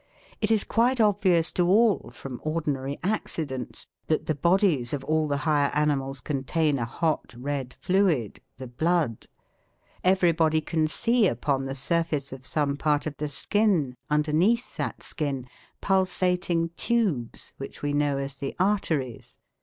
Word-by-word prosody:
It 210 - +1
is 220 -2 +4
quite 245 +2 +2
obvious 190 -6 +3
to 175 +1 +1
all, 215 +1 +3
from 125 +1 -8
ordinary 145 -3 -2
accidents, 155 - -3 0.2
that 155 - 0
the 155 - 0
bodies 170 - +2
of 140 -2 -3
all 155 +1 +1
the 140 -1 0
higher 145 -3 +3
animals 135 -3 0
contain 145 +1 0
a 115 - -1
hot 155 +1 -2
red 135 -1 -3
fluid 180 - +1 0.2
the 130 - -7
blood. 150 -1 -1 0.8
Everybody 170 -4 +3
can 155 0 0
see 230 +6 +3
upon 135 0 -1
the 135 0 -4
surface 150 -1 -1
of 130 0 -8
some 145 -2 0
part 145 0 +1
of 150 -2 -5
the 150 0 -3
skin, 170 -4 +1
underneath 160 - +1
that - - -4
skin, 140 -5 -3 0.4
pulsating 180 -3 +1
tubes, 170 - -1
which 135 - -8
we 145 0 0
know 145 -1 +1
as 135 0 -5
the 135 - -4
arteries. 160 - -1
155 Hz, 145 wpm, -26 LUFS, 135-180 Hz, 0.8 s, is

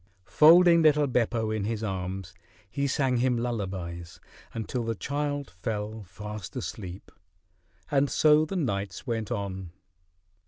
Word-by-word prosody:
Folding 170 +2 +7
little 150 -2 +5
Beppo 115 -4 0
in 110 -2 -1
his 110 0 -2
arms, 95 -3 -4 0.3
he 140 +9 -2
sang 135 -2 +1
him 125 0 +2
lullabies 95 -8 -4 0.3
until 115 +2 -3
the 115 0 -2
child 145 +3 -3
fell 105 0 -4
fast 105 +1 -8
asleep. 90 +1 -6 0.8
And 140 -1 +3
so 155 0 +5
the 195 - -5
nights 100 - -2
went 115 -4 -2
on. 95 -5 -4
115 Hz, 125 wpm, -27 LUFS, 100-140 Hz, 0.8 s, Folding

